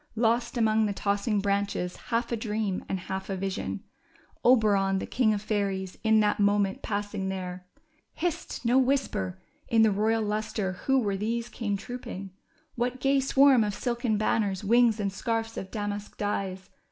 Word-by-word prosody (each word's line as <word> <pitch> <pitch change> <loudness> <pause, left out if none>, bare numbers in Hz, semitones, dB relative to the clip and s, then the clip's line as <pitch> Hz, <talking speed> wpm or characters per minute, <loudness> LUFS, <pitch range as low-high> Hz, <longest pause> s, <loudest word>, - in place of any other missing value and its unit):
Lost 235 +2 +1
among 220 -1 +3
the 205 - -1
tossing 205 +2 0
branches, 200 -2 -1
half 235 +1 0
a - - +2
dream 215 -3 -2
and 190 -2 -2
half 190 +2 -5
a 195 - -1
vision, 185 - -3 0.6
Oberon, 205 -6 +4
the - - -3
king 235 -4 +2
of 205 -1 -1
fairies, 195 -3 -1
in 220 -1 +5
that 210 0 +1
moment 200 -1 +2
passing 205 -2 -3
there! 180 -1 -5 0.5
Hist! 340 -6 -3
No 245 +3 +5
whisper! 235 -9 0 0.3
In 225 -1 +4
the 220 - +5
royal 220 +3 +1
lustre 210 -2 -2
Avho 270 -2 +4
were 200 -2 0
these 230 +3 -2
came 205 -4 -2
trooping? 200 -4 -7 0.4
What 245 +1 -2
gay 275 +1 +3
swarm 270 -2 +5
of 205 -2 -2
silken 235 -3 -1
banners, 205 -2 0
wings, 230 +1 +4
and 200 -2 -1
scarfs 225 +2 -2
of 190 - -5
damask 205 -1 -4
dyes 195 -2 -3
210 Hz, 165 wpm, -28 LUFS, 195-230 Hz, 0.6 s, in